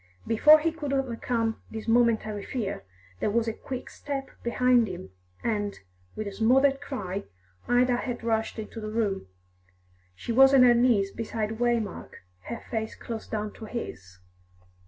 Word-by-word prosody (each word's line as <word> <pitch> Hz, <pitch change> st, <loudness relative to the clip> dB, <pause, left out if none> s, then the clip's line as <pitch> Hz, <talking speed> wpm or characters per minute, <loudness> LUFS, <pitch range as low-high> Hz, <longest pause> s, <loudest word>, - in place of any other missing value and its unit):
Before 300 Hz, +7 st, +7 dB
he 325 Hz, +2 st, 0 dB
could 300 Hz, -4 st, -4 dB
overcome 235 Hz, -3 st, -1 dB
this 220 Hz, 0 st, -7 dB
momentary 225 Hz, -3 st, +2 dB
fear, 220 Hz, -, -3 dB, 0.4 s
there -, -, +1 dB
was 230 Hz, +2 st, +1 dB
a 225 Hz, -, 0 dB
quick 255 Hz, +2 st, -6 dB
step 275 Hz, -2 st, -5 dB
behind 245 Hz, 0 st, +3 dB
him, 175 Hz, -, -7 dB, 0.3 s
and, 205 Hz, -3 st, -1 dB, 0.4 s
with 215 Hz, -, -4 dB
a 200 Hz, -, -4 dB
smothered 270 Hz, +6 st, +3 dB
cry, 200 Hz, -9 st, -4 dB, 0.4 s
Ida 245 Hz, 0 st, +3 dB
had 245 Hz, -2 st, -4 dB
rushed 225 Hz, -1 st, 0 dB
into 220 Hz, +1 st, -6 dB
the 215 Hz, -, -4 dB
room. 210 Hz, -, -1 dB, 0.9 s
She 95 Hz, -, -5 dB
was 270 Hz, +3 st, +7 dB
on 260 Hz, -, +8 dB
her 245 Hz, -1 st, +7 dB
knees 235 Hz, -5 st, +3 dB
beside 220 Hz, 0 st, -3 dB
Waymark, 235 Hz, -, -1 dB, 0.2 s
her 235 Hz, -, -6 dB
face 220 Hz, -2 st, -2 dB
close 225 Hz, -2 st, -6 dB
down 210 Hz, -1 st, -3 dB
to 220 Hz, -, -9 dB
his. 95 Hz, -, -7 dB
230 Hz, 155 wpm, -27 LUFS, 215-250 Hz, 0.9 s, on